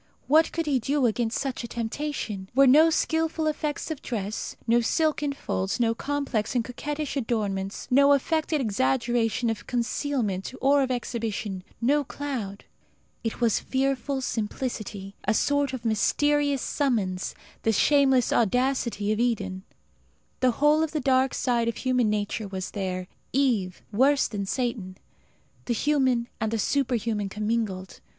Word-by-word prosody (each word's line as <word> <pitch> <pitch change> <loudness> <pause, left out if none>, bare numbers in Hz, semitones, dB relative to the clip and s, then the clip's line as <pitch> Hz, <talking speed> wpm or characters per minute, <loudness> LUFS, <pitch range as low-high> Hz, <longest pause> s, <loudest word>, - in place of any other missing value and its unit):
What 315 +3 +4
could 330 0 -2
he 280 -4 +2
do 275 +3 +1
against 225 0 0
such 270 -3 -3
a - - -4
temptation? 230 -4 -4
Here - - -30
were 275 +1 +7
no 305 +5 +7
skilful 320 0 0
effects 300 0 -2
of 310 - -5
dress, 215 -3 -4
no 235 +1 +4
silken 300 +3 +1
folds, 195 -7 -2
no 230 -1 +3
complex 275 -4 -2
and 235 -2 +1
coquettish 295 +4 -4
adornments, 205 -6 -2
no 280 +2 +6
affected 310 +2 +1
exaggeration 225 - +1
of 220 - -6
concealment 235 -5 -1
or 280 +1 +4
of 265 - 0
exhibition, 225 -6 -3 0.2
no 285 +5 +2
cloud. 250 -9 -5 0.6
It 225 +1 -3
was 230 -3 +3
fearful 270 +1 -1
simplicity 215 -4 -4
a 215 +2 +2
sort 285 +3 +2
of 255 -3 -6
mysterious 285 +5 +2
summons 210 -10 -1 0.3
the 225 - +2
shameless 265 +2 +4
audacity 235 -2 +1
of 215 - 0
Eden. 200 -6 -1 0.8
The 255 - +4
whole 300 +2 +4
of 320 -1 -1
the 310 - 0
dark 260 -1 +2
side 235 -2 +1
of 230 - -1
human 250 -3 +1
nature 210 +1 -2
was 190 -1 -5
there. 185 -2 -3 0.3
Eve 230 -10 +1
worse 270 +6 +3
than 200 -2 -4
Satan; 220 -6 -2 0.7
the 240 - 0
human 260 -3 +2
and 220 - 0
the 225 - -1
superhuman 230 -4 0
commingled. 210 -3 -2
240 Hz, 145 wpm, -26 LUFS, 215-280 Hz, 0.8 s, were